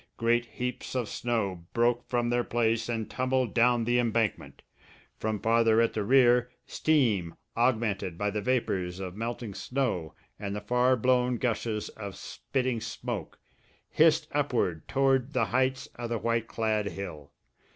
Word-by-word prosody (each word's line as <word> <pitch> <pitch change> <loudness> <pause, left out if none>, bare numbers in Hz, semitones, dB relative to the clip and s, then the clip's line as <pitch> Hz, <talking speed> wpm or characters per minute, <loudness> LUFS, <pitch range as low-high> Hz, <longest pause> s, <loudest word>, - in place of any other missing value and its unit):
Great 120 +1 +2
heaps 125 +1 -4
of 125 -3 0
snow 100 -9 -2
broke 120 +1 +1
from 120 -1 0
their 120 0 +2
place 115 -1 0
and 115 -2 -2
tumbled 130 -2 0
down 120 0 +4
the 120 +2 +2
embankment. 115 -2 -1 0.6
From 110 -1 -1
farther 115 +1 +3
at 115 - +2
the 105 - -1
rear, 125 +1 +4 0.2
steam, 115 - +1 0.2
augmented 110 -7 0
by 105 +1 0
the 105 +1 -2
vapours 95 -7 -1
of 95 -1 -5
melting 115 -1 -4
snow 95 - -2 0.2
and 100 -1 -4
the - - -2
far 125 +4 +3
blown 125 +1 +2
gushes 115 -2 -2
of 100 -3 -8
spitting 130 -4 -3
smoke, 115 -4 -5 0.5
hissed - - +4
upward 80 -3 0
toward 135 0 +2
the 125 -3 +2
heights 130 +3 0
of 120 -1 -4
the 115 - 0
white 115 0 -1
clad 110 -3 0
hill. 85 -8 -7
115 Hz, 150 wpm, -28 LUFS, 105-125 Hz, 0.6 s, down